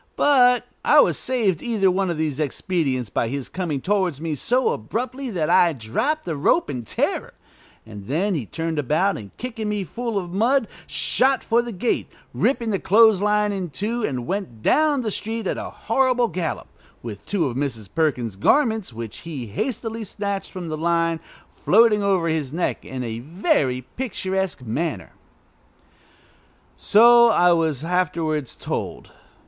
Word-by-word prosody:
But 250 -4 +4 0.2
I - - +6
was - - +4
saved 215 -10 0
either 220 -5 +1
of 185 -3 0
these 155 -3 -2
expedients 140 - -1
by 115 - 0
his 135 +2 -4
coming 165 -7 -3
towards 185 -6 0
me 160 -1 -3
so 245 - +1
abruptly 250 - -3
that 170 -8 -1
I 170 -2 +4
dropped 215 - -2
the 165 - -3
rope 240 - +2
in 125 -3 -5
terror, - - -2 0.5
and 105 -3 -10
then 175 - 0
he 135 - -3
turned 165 -1 -3
about, 155 +8 +1
and, 100 -2 -8
kicking 225 -4 -4
me 210 -1 -1
full 230 - -4
of 180 -3 -3
mud, 230 +4 +2 0.2
shot 265 +1 +2
for 235 +1 +2
the 240 0 -6
gate, 225 +4 -1 0.3
ripping 235 -4 0
the 195 - 0
clothes 220 -1 +5
line 210 0 +2
in 190 -3 -3
two, 220 +9 -3
and 125 - -2
went 195 +3 -2
on 115 -2 -19
down 300 -3 +3
the 220 -3 -2
street 225 +2 -3
at - - -2
a - - -5
horrible 250 0 +1
gallop, 175 -3 -4 0.3
with 110 -4 -7
two 195 -5 +1
of 125 -4 -3
Mrs. 125 -7 -3
Perkins' 125 -10 0
garments, 220 - +2
which 115 -1 -7
he 150 -7 -6
hastily 225 - -3
snatched 200 -1 -4
from 180 -3 -6
the 155 - -3
line, 165 0 +1 0.3
floating 215 +1 +4
over 190 -4 +1
his 155 -5 -1
neck 170 +3 -2
in 130 -1 -5
a 115 -1 -4
very 145 - 0 0.2
picturesque 190 - -2
manner. 145 +9 -3 1.6
So 235 +2 +6
I 180 -6 +4
was 160 -5 +1
afterwards 160 -5 -1
told. - - -5
185 Hz, 165 wpm, -22 LUFS, 150-225 Hz, 1.6 s, I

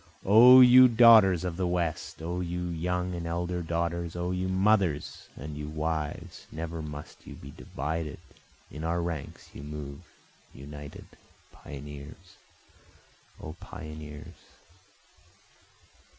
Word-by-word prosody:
O 120 +6 +9
you 125 +1 +9
daughters 110 -7 +6
of 90 -2 -4
the 90 -1 -1
West! 85 -2 -3
O 85 +2 -3
you 90 0 -4
young 90 +2 -2
and 85 -1 -5
elder 85 +1 -3
daughters! 85 0 -3
O 90 +1 -3
you 90 0 -2
mothers 95 -5 0
and 75 +2 -8
you 75 0 -6
wives! 80 -1 -4
Never 80 +1 -5
must 75 -1 -10
you - - -9
be 70 - -11
divided, 75 +3 -5 0.5
in 75 - -8
our 85 +1 -1
ranks 85 -4 -6
you - - -9
move 75 -1 -8 0.5
united, 70 +1 -10 0.5
Pioneers! 70 0 -11 1.0
O 75 - -8
pioneers! 75 -1 -10
85 Hz, 120 wpm, -28 LUFS, 75-90 Hz, 1.0 s, O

